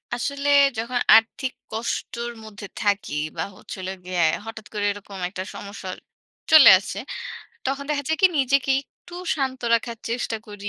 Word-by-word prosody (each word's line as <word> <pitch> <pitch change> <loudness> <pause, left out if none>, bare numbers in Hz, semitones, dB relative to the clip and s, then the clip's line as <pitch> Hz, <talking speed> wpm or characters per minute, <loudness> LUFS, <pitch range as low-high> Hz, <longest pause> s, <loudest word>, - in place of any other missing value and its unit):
আসলে 280 +3 -2 0.3
যখন 245 +2 -1 0.2
আর্থিক 230 +4 +2 0.2
কষ্টর 235 +1 -3
মধ্যে 210 -1 -9 0.2
থাকি 200 -7 0 0.2
বা - - 0
হচ্ছে - - -9
হলো 185 - -4
গিয়ে 180 -1 -1 0.2
হঠাৎ 220 -1 -8
করে 205 -1 -1
এরকম 200 -1 -9
একটা 185 -1 -5
সমস্যা 200 -2 -8 0.6
চলে 315 -3 +10
আসে। - - -6 0.7
তখন 275 +1 -2
দেখা 290 -1 0
যায় 320 - 0
কি - - +10
নিজেকে 275 0 +2
একটু 350 +5 -17 0.2
শান্ত 265 -2 -2
রাখার 230 0 -1
চেষ্টা 235 -1 -2
করি। 205 -1 -7
230 Hz, 150 wpm, -23 LUFS, 205-270 Hz, 0.7 s, চলে